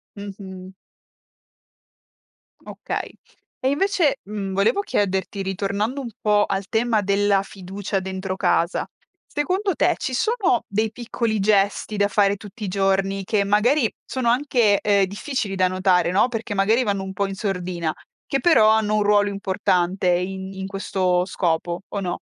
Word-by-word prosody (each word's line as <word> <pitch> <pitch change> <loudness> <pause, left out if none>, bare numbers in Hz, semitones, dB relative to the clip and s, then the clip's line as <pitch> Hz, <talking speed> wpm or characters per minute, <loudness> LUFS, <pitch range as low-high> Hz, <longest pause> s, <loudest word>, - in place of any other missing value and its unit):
Mh-mh. 190 -2 -9 1.9
Okay. - - -5 0.5
E 260 - +1
invece, 325 -2 +1
mhmm, 200 -2 -5
volevo 205 - +2
chiederti 195 - -1
ritornando 200 +7 -2
un 245 - -5
po' 210 -1 +3
al 195 0 -3
tema 225 -1 +1
della 200 0 +2
fiducia 195 +1 -4
dentro 190 0 -4
casa, 170 -1 +1 0.4
secondo 370 +6 -1
te - - +2
ci 260 - -4
sono 405 - +1
dei 215 +2 0
piccoli 230 -2 -2
gesti 205 +1 +1
da 200 0 +3
fare 200 0 +2
tutti 210 +2 -11
i 200 - -2
giorni 195 0 0
che 200 +1 +1
magari 225 +6 +2
sono 255 -3 -1
anche, 240 -5 +3
ehm, 200 -2 +3
difficili 205 0 -3
da 185 -1 +3
notare, 180 -2 +2
no, 190 - +3
perché 225 -2 -4
magari 215 +6 +3
vanno 200 -3 -1
un 190 - -6
po' 200 +1 -1
in 195 - -5
sordina, 180 -5 -2 0.3
che 275 - 0
però 245 -8 +5
hanno 215 -1 +2
un 210 - +2
ruolo 205 0 +3
importante 190 -2 0
in 190 +2 -1
in 190 0 -5
questo 185 -2 0
scopo 175 -1 -1
o 200 - -4
no? 180 -2 -3
200 Hz, 150 wpm, -22 LUFS, 190-220 Hz, 1.9 s, però